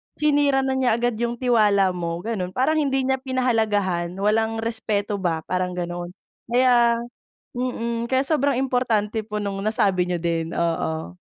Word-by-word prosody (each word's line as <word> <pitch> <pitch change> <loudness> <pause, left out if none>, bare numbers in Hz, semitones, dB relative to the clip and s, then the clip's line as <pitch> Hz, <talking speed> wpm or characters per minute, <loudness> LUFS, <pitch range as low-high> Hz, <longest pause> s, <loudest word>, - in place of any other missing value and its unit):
sinira 290 -3 +2
na 265 0 0
niya 245 -3 +3
agad 240 0 0
yung 235 0 -1
tiwala 210 -6 +3
mo 170 -1 -3
ganon 185 -5 -3
parang 310 +5 +2
hindi 270 -2 +1
niya 265 0 0
pinahalagahan, 215 -9 0
walang 220 +2 0
respeto 210 -3 -1
ba, 165 -4 -1
parang 180 0 -2
ganon. 175 +1 -5 0.3
Kaya 240 -1 +3 0.5
mm 235 -2 -2
kaya 260 +2 +1
sobrang 280 -3 +1
importante 225 -4 0
po 210 -1 -4
nung 200 -1 -3
nasabi 195 -4 +2
niyo 175 -2 -2
din, 165 -1 -1
oo. 165 0 -2
220 Hz, 150 wpm, -23 LUFS, 185-255 Hz, 0.5 s, niya